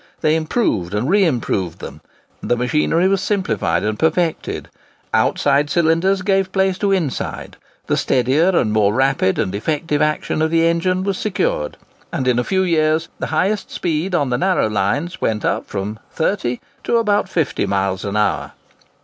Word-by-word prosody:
They 155 Hz, -1 st, +3 dB
improved 155 Hz, -, -1 dB
and 110 Hz, +5 st, -1 dB
re 200 Hz, +4 st, +4 dB
improved 105 Hz, -, -1 dB
them; -, -, -9 dB, 0.4 s
the 120 Hz, -, 0 dB
machinery 150 Hz, +8 st, +1 dB
was 195 Hz, 0 st, +1 dB
simplified 110 Hz, -, 0 dB
and 105 Hz, 0 st, -2 dB
perfected; 160 Hz, +1 st, 0 dB, 0.5 s
outside 145 Hz, +1 st, +2 dB
cylinders 170 Hz, +4 st, +2 dB
gave 195 Hz, -1 st, +1 dB
place 190 Hz, -1 st, +1 dB
to 200 Hz, -1 st, +1 dB
inside; 170 Hz, -9 st, -2 dB, 0.3 s
the -, -, 0 dB
steadier 135 Hz, +7 st, +2 dB
and 120 Hz, -, +1 dB
more 105 Hz, -1 st, +2 dB
rapid 130 Hz, -7 st, +2 dB
and 100 Hz, -4 st, -1 dB
effective 150 Hz, +7 st, -1 dB
action 150 Hz, 0 st, 0 dB
of 160 Hz, -, +2 dB
the 165 Hz, 0 st, +3 dB
engine 185 Hz, +2 st, +1 dB
was 195 Hz, -1 st, -2 dB
secured; 185 Hz, -, -1 dB, 0.3 s
and 130 Hz, -, -2 dB
in 125 Hz, -1 st, +3 dB
a -, -, +1 dB
few 190 Hz, +5 st, +1 dB
years 160 Hz, -2 st, +1 dB
the -, -, -2 dB
highest 190 Hz, +6 st, 0 dB
speed 175 Hz, +2 st, -2 dB
on 140 Hz, -6 st, 0 dB
the 125 Hz, -, 0 dB
narrow 185 Hz, -, +2 dB
gauge -, -, -6 dB
lines 110 Hz, -, -1 dB
went 110 Hz, -1 st, -1 dB
up -, -, -1 dB
from 105 Hz, +2 st, -4 dB
30 160 Hz, -8 st, -1 dB, 0.2 s
to 235 Hz, -, +2 dB
about 205 Hz, -4 st, +1 dB
50 160 Hz, -, -1 dB
miles 95 Hz, -1 st, -1 dB
an 100 Hz, +1 st, -2 dB
hour. 105 Hz, -, 0 dB
155 Hz, 170 wpm, -19 LUFS, 115-185 Hz, 0.5 s, re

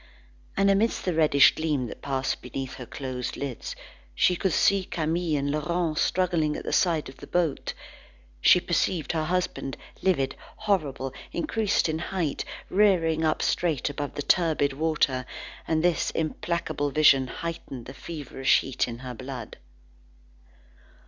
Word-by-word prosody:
And, 195 Hz, 0 st, +4 dB
amidst 210 Hz, +4 st, +1 dB
the 180 Hz, -, +1 dB
reddish 155 Hz, -3 st, +6 dB
gleam 150 Hz, -5 st, -1 dB
that -, -, -8 dB
passed 135 Hz, -1 st, -1 dB
beneath 130 Hz, +1 st, -5 dB
her 125 Hz, -3 st, -8 dB
closed 130 Hz, -1 st, -4 dB
lids, 135 Hz, -4 st, -5 dB, 0.4 s
she 180 Hz, -, +4 dB
could 190 Hz, +1 st, 0 dB
still 200 Hz, +4 st, +4 dB
see -, -, -5 dB
Camille 160 Hz, -1 st, -1 dB
and 140 Hz, 0 st, -1 dB
Laurent 160 Hz, +2 st, -1 dB
struggling 170 Hz, -5 st, +1 dB
at -, -, -6 dB
the -, -, -2 dB
side 165 Hz, -4 st, +2 dB
of 130 Hz, -, -11 dB
the -, -, -11 dB
boat. 170 Hz, -5 st, -1 dB, 0.7 s
She 180 Hz, -, +7 dB
perceived 175 Hz, -1 st, 0 dB
her 160 Hz, -2 st, -1 dB
husband, 175 Hz, -5 st, -2 dB, 0.2 s
livid, 160 Hz, -9 st, +1 dB, 0.2 s
horrible, 150 Hz, -11 st, -1 dB, 0.2 s
increased 220 Hz, -, +1 dB
in 160 Hz, 0 st, -1 dB
height, 175 Hz, -3 st, -2 dB, 0.2 s
rearing 175 Hz, -6 st, +3 dB
up 155 Hz, -, +1 dB
straight 155 Hz, -5 st, 0 dB
above 145 Hz, 0 st, -5 dB
the 145 Hz, -, -3 dB
turbid 150 Hz, -3 st, +2 dB
water, 140 Hz, -4 st, +1 dB, 0.4 s
and 160 Hz, 0 st, +1 dB
this 175 Hz, -1 st, +2 dB
implacable 160 Hz, -2 st, -2 dB
vision 135 Hz, -2 st, +5 dB
heightened 135 Hz, -5 st, -6 dB
the 130 Hz, -, -8 dB
feverish 135 Hz, -2 st, 0 dB
heat 130 Hz, -1 st, -1 dB
of 120 Hz, 0 st, -7 dB
her 130 Hz, -1 st, -6 dB
blood. 130 Hz, -1 st, -7 dB
155 Hz, 150 wpm, -26 LUFS, 135-175 Hz, 0.7 s, She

